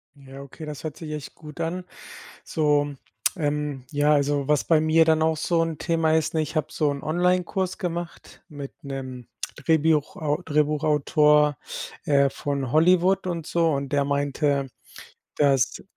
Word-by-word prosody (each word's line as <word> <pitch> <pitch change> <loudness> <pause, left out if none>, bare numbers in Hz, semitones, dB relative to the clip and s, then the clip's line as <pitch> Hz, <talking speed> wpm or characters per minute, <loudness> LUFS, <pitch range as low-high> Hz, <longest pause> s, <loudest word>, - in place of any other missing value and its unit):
Ja 135 -1 -12
okay, 140 +3 -10
das 150 -2 -7
hört 155 -2 -5
sich 155 -2 -7
echt 150 -2 -7
gut 150 0 -12
an. 175 +3 -2 0.6
So, 145 -2 +1 0.4
ähm, 150 -4 -2
ja, 145 +1 +2
also, 145 -1 +1
was 150 -2 +2
bei 160 -2 +4
mir 160 +1 +4
dann 160 -1 +3
auch 160 0 +2
so 165 +2 +1
'n 165 -2 -3
Thema 165 -1 +1
ist, 160 0 0
ne: 160 - +2
Ich 155 +2 -6
habe 155 -1 0
so 150 -2 +1
'n 140 -1 -5
Onlinekurs 180 +3 0
gemacht 175 -1 -6
mit 145 -4 -8
'nem 130 -3 -7 0.3
Drehbiuchau 155 0 +1
Drehbuchautor, 150 -1 +3 0.5
äh, 140 -1 +4
von 140 -3 -3
Hollywood 180 +4 +4
und 170 -3 -3
so. 165 -1 +2
Und 140 -1 -3
der 140 -1 +2
meinte, 140 0 0 0.7
dass 135 -4 +2
150 Hz, 155 wpm, -24 LUFS, 145-160 Hz, 0.7 s, bei